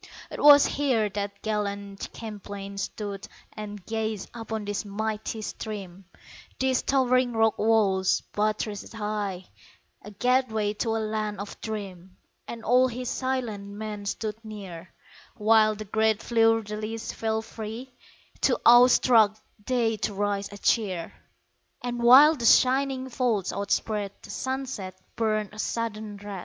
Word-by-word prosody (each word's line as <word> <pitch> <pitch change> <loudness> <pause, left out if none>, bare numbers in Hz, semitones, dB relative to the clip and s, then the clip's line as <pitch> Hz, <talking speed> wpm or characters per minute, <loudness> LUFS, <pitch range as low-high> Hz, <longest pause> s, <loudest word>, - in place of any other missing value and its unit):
'Twas 290 -1 +7
here 250 -7 +1
that 200 0 -4
gallant 200 -2 -3
Champlain 200 -2 -7
stood 200 0 -5 0.3
And 205 -3 -8
gazed 220 -2 -3
upon 225 -2 -5
this 205 +1 -2
mighty 215 +1 -4
stream, 195 -4 -7 0.5
These 260 -1 +1
towering 255 -2 +2
rock 225 -1 +2
walls, 205 -4 +3
buttressed 210 0 -2
high 210 -4 -3 0.6
A 210 - -10
gateway 220 -1 +1
to 225 +1 -1
a - - +1
land 215 -1 -3
of 200 0 -8
dream; 190 -4 -7 0.3
And 230 -1 -7
all 250 +2 +5
his 250 0 -5
silent 245 -6 -2
men 205 0 -6
stood 220 +2 -4
near 190 -5 -9 0.5
While 215 -1 +4
the 215 +1 -7
great 220 +1 +1
fleur 225 -1 +3
de 210 +1 -6
lis 220 +1 -5
fell 220 0 -2
free, 225 +3 -8 0.5
(Too - - +3
awe 240 +1 +9
struck 225 -4 +4 0.3
they 235 -3 +1
to 205 0 -3
raise 200 0 -1
a 205 - -9
cheer) 190 -6 0 0.7
And 240 -1 -3
while 270 +6 +8
the 240 -5 -4
shining 260 +2 +4
folds 235 -7 0
outspread 200 0 -1
The - - -9
sunset 260 -8 -4 0.2
burned 215 -2 -1
a 210 - -11
sudden 215 -2 -3
red. 200 -1 -7
215 Hz, 135 wpm, -26 LUFS, 205-230 Hz, 0.7 s, awe